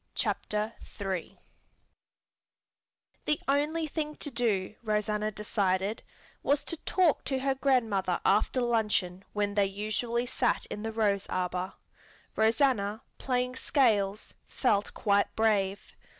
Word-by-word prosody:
CHAPTER 210 Hz, +1 st, -1 dB, 0.3 s
III 190 Hz, -4 st, -3 dB, 1.9 s
The 300 Hz, -, +2 dB
only 300 Hz, +4 st, +1 dB
thing 300 Hz, 0 st, -3 dB
to 290 Hz, -, -4 dB
do, 220 Hz, -6 st, 0 dB
Rosanna 210 Hz, -1 st, 0 dB
decided, 200 Hz, -1 st, 0 dB, 0.4 s
was 285 Hz, +1 st, +2 dB
to 335 Hz, -, -3 dB
talk 360 Hz, -5 st, +3 dB
to 265 Hz, -, 0 dB
her 270 Hz, +1 st, +1 dB
grandmother 225 Hz, -9 st, +1 dB
after 215 Hz, +5 st, +3 dB
luncheon 210 Hz, -6 st, 0 dB
when 205 Hz, -1 st, 0 dB
they 200 Hz, -1 st, +3 dB
usually 215 Hz, +4 st, -2 dB
sat 245 Hz, 0 st, 0 dB
in 210 Hz, -, -4 dB
the 225 Hz, +1 st, -3 dB
rose 205 Hz, -3 st, +1 dB
arbor. 180 Hz, +1 st, -2 dB, 0.6 s
Rosanna, 220 Hz, -2 st, +2 dB, 0.2 s
playing 250 Hz, -1 st, 0 dB
scales, 215 Hz, -7 st, +1 dB
felt 210 Hz, -6 st, +1 dB
quite 200 Hz, -1 st, +2 dB
brave. 205 Hz, -3 st, +1 dB
215 Hz, 115 wpm, -29 LUFS, 200-255 Hz, 1.9 s, talk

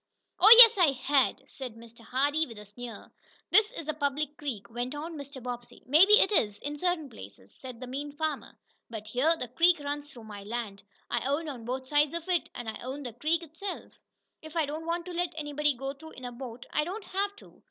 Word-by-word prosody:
"Oh, 405 Hz, -, +7 dB
yes, 460 Hz, -4 st, +11 dB
I 320 Hz, -6 st, +5 dB
had!" 270 Hz, +1 st, +1 dB
said 255 Hz, -4 st, -8 dB
Mr. 230 Hz, 0 st, -15 dB
Hardee 285 Hz, +7 st, 0 dB
with 230 Hz, -3 st, -11 dB
a 210 Hz, -, -10 dB
sneer. 225 Hz, +2 st, -10 dB, 0.4 s
"This 430 Hz, +1 st, +5 dB
is 330 Hz, -11 st, -7 dB
a 310 Hz, -, -1 dB
public 295 Hz, 0 st, -2 dB
creek," 260 Hz, -10 st, -5 dB
went 245 Hz, +4 st, -4 dB
on 320 Hz, +3 st, -6 dB
Mr. 280 Hz, -3 st, -9 dB
Bobbsey. 245 Hz, -1 st, -7 dB
"Maybe 325 Hz, +10 st, +6 dB
it 425 Hz, -, +6 dB
is, 210 Hz, -, +2 dB
in 290 Hz, +1 st, -4 dB
certain 350 Hz, -3 st, 0 dB
places," 100 Hz, -, -13 dB
said 255 Hz, -3 st, -10 dB
the 255 Hz, -, -6 dB
mean 280 Hz, +3 st, -5 dB
farmer, 305 Hz, 0 st, -4 dB, 0.3 s
"but 220 Hz, -2 st, -7 dB
here 260 Hz, +9 st, +1 dB
the 250 Hz, -, -4 dB
creek 335 Hz, +7 st, +4 dB
runs 290 Hz, 0 st, -5 dB
through 245 Hz, -5 st, -13 dB
my 205 Hz, -2 st, -9 dB
land. 210 Hz, -2 st, -5 dB, 0.3 s
I -, -, 0 dB
own 295 Hz, +4 st, -1 dB
on 250 Hz, -6 st, -7 dB
both 260 Hz, +2 st, -4 dB
sides 295 Hz, +2 st, +2 dB
of 335 Hz, 0 st, -5 dB
it, 355 Hz, -2 st, +1 dB
and 240 Hz, -, -6 dB
I 220 Hz, -, -5 dB
own 270 Hz, +3 st, -6 dB
the 245 Hz, -3 st, -6 dB
creek 315 Hz, +8 st, 0 dB
itself. 335 Hz, +5 st, -7 dB, 0.5 s
If 315 Hz, +1 st, -12 dB
I 325 Hz, -2 st, +2 dB
don't 310 Hz, +3 st, -6 dB
want 340 Hz, +1 st, -2 dB
to 360 Hz, -, -7 dB
let 350 Hz, 0 st, -1 dB
anybody 295 Hz, -2 st, 0 dB
go 270 Hz, +2 st, -5 dB
through 320 Hz, +3 st, -13 dB
in 255 Hz, -, -10 dB
a 245 Hz, -, -5 dB
boat, 240 Hz, -1 st, -9 dB
I 300 Hz, -, +2 dB
don't 385 Hz, +7 st, -6 dB
have 400 Hz, +2 st, -2 dB
to." -, -, -17 dB
285 Hz, 225 wpm, -29 LUFS, 245-320 Hz, 0.5 s, yes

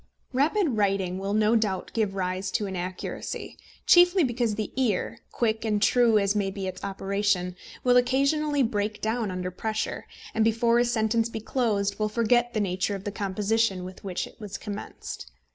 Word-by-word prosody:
Rapid 320 Hz, +8 st, +2 dB
writing 195 Hz, -3 st, +1 dB
will 200 Hz, +1 st, -2 dB
no 215 Hz, +1 st, +3 dB
doubt 210 Hz, -4 st, 0 dB
give 210 Hz, -4 st, 0 dB
rise 185 Hz, 0 st, -2 dB
to 210 Hz, -, 0 dB
inaccuracy, 185 Hz, -1 st, -5 dB, 0.3 s
chiefly 355 Hz, +1 st, +6 dB
because 240 Hz, -4 st, 0 dB
the 215 Hz, -1 st, -3 dB
ear, 240 Hz, -8 st, 0 dB
quick 220 Hz, -2 st, 0 dB
and 215 Hz, -2 st, +1 dB
true 230 Hz, +1 st, +4 dB
as 200 Hz, 0 st, +2 dB
may 200 Hz, -2 st, +1 dB
be 195 Hz, 0 st, -5 dB
its 185 Hz, -1 st, -6 dB
operation, 195 Hz, -2 st, -1 dB, 0.3 s
will 250 Hz, -1 st, +5 dB
occasionally 275 Hz, +3 st, +2 dB
break 210 Hz, -2 st, -1 dB
down 220 Hz, -1 st, -1 dB
under 180 Hz, 0 st, -3 dB
pressure, 215 Hz, +4 st, -3 dB, 0.3 s
and, 220 Hz, -, +2 dB
before 230 Hz, +1 st, +3 dB
a 240 Hz, -, +4 dB
sentence 230 Hz, -1 st, +1 dB
be 225 Hz, -, -5 dB
closed, 210 Hz, -4 st, 0 dB
will 215 Hz, 0 st, +1 dB
forget 240 Hz, +2 st, +2 dB
the -, -, +2 dB
nature 190 Hz, 0 st, 0 dB
of 195 Hz, -, -7 dB
the 205 Hz, -, -3 dB
composition 200 Hz, 0 st, 0 dB
with 185 Hz, 0 st, -9 dB
which 185 Hz, -3 st, -3 dB
it -, -, -15 dB
was 210 Hz, -2 st, -6 dB
commenced. 205 Hz, -, -7 dB
215 Hz, 175 wpm, -26 LUFS, 195-235 Hz, 0.3 s, chiefly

